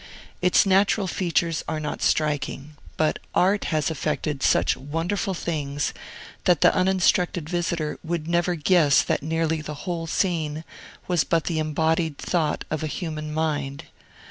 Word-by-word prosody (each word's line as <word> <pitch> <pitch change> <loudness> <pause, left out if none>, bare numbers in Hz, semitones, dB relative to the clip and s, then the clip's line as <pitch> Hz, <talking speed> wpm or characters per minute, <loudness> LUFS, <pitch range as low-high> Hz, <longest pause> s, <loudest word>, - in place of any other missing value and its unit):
Its 180 +2 +4
natural 195 +1 +3
features 170 -3 0
are 155 - -2
not 150 -1 -4
striking; 150 -1 0 0.2
but 155 -1 +1 0.2
Art 195 +3 +3
has 155 -1 0
effected 150 -1 -2
such - - +3
wonderful 165 +8 -2
things 145 -4 -2 0.5
that 175 -4 +4
the - - +6
uninstructed 185 -3 +2
visitor 170 -3 -2
would 165 -1 -3
never 175 +1 +1
guess 155 -3 +4
that - - 0
nearly 160 +1 -1
the 150 +1 -7
whole 170 -3 -3
scene 160 -4 -1 0.4
was 175 -5 +2
but 165 +2 +1
the 165 -2 -1
embodied 160 0 0
thought 160 -4 -1
of 155 - -1
a 155 - -2
human 155 -1 -4
mind. 150 -3 -2
160 Hz, 145 wpm, -24 LUFS, 150-175 Hz, 0.5 s, the